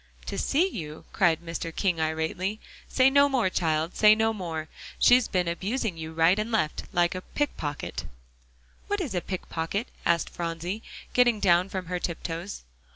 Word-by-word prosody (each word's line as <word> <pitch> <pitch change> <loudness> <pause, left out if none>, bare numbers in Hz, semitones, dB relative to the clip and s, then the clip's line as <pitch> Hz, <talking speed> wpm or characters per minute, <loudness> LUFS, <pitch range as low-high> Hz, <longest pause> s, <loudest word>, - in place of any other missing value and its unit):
"To - - -4
see 325 +7 +2
you?" 155 - -7
cried 170 -4 +3
Mr. 165 0 -4
King 180 0 0
irately. 160 +6 -1 0.3
"Say 260 0 +4
no 280 +1 +5
more, 245 -9 +1
child, 160 -1 0
say 215 0 +7
no 225 0 +2
more. 165 -6 -4 0.3
She's 245 -1 +5
been 180 -2 0
abusing 195 +4 -2
you 160 0 -6
right 165 +5 +3
and 215 +2 -2
left, 180 -9 0
like 175 -1 +2
a 185 - -5
pick 290 +8 -2
pocket." 145 -1 -4 0.8
"What 410 0 0
is 310 - -3
a 180 - 0
pick 185 0 -5
pocket?" 170 +7 -2
asked 170 0 +1
Phronsie, 170 +4 -4 0.3
getting 240 -3 +4
down 180 -1 +4
from 185 -2 -4
her 180 +1 -3
tiptoes. 170 +2 -5
180 Hz, 170 wpm, -27 LUFS, 165-220 Hz, 0.8 s, say